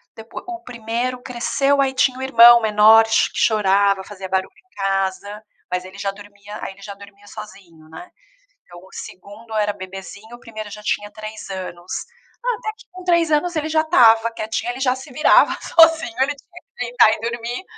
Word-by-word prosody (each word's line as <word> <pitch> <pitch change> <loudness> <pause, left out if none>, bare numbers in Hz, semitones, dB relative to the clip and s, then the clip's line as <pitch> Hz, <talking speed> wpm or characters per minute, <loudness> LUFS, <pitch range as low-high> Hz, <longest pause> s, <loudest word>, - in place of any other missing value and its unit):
depo 225 +1 -9
o 355 -1 -7
1º 245 +1 -4
cresceu, 255 +3 0
aí 270 -1 +1
tinha 260 -1 +1
o - - -7
irmão 240 -2 +7
menor 220 +1 +6
ch 225 - +2
chorava, 200 -2 +2
fazia 195 -1 -9
barulho 190 0 -2
em 370 - -27
casa, 195 +1 -3 0.3
mas 180 0 -2
ele 190 +1 -12
já 200 0 -3
dormia 205 +1 -12
aí 195 - -6
ele 200 - -20
já 200 0 -8
dormia 200 0 -16
sozinho, 185 -7 -13
né. 170 +3 -11 0.5
Então, 175 0 -14
o 190 - -18
2º 210 +4 -11
era 210 -1 0
bebezinho, 195 +4 -10
o - - -24
1º 215 -3 -9
já 210 - -9
tinha 205 0 -3
3 215 0 -9
anos. 185 -2 -8 0.5
Ah, - - 0
até 450 -3 -5
que - - -17
com 370 0 -11
3 340 -2 +2
anos, 320 +3 0
ele 310 0 -2
já 315 0 +2
estava 230 -8 +4
quietinho, 225 +1 -4
ele 250 - -9
já 255 -1 +1
se 265 +2 -11
virava 300 +5 +4
sozinho, 325 -7 +4
ele 275 +2 +1
tinha 355 +5 -17
que 245 - -7
deitar 240 -2 +4
e - - -5
dormir, 235 +7 -5
220 Hz, 190 wpm, -20 LUFS, 200-255 Hz, 0.5 s, irmão